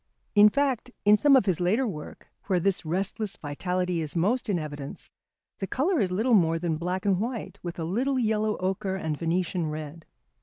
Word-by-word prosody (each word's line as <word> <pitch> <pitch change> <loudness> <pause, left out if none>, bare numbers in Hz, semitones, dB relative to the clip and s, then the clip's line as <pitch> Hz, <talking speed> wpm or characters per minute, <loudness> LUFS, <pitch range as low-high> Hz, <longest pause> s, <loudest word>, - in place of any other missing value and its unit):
In 210 0 +8
fact, 265 -1 0 0.2
in 205 +1 +7
some 280 +6 +5
of 260 - +4
his 185 -5 +1
later 205 +9 +2
work, 155 -10 -7 0.2
where 185 -3 +2
this 195 +1 +1
restless 195 +4 -2
vitality 180 +4 -2
is 155 0 -4
most 220 +8 +1
in 195 - +2
evidence, 145 -3 -6 0.5
the 195 - -3
colour 310 - +1
is 190 -3 +1
little 220 +7 +1
more 165 -5 +4
than 165 -2 -1
black 180 +4 -3
and 195 -3 +2
white, 235 +2 -4
with 175 -1 -6
a 165 - -3
little 250 +11 0
yellow 215 -3 +1
ochre 190 +1 -2
and 160 -5 -2
Venetian 170 +1 -1
red. 155 +1 -7
185 Hz, 190 wpm, -27 LUFS, 165-215 Hz, 0.5 s, In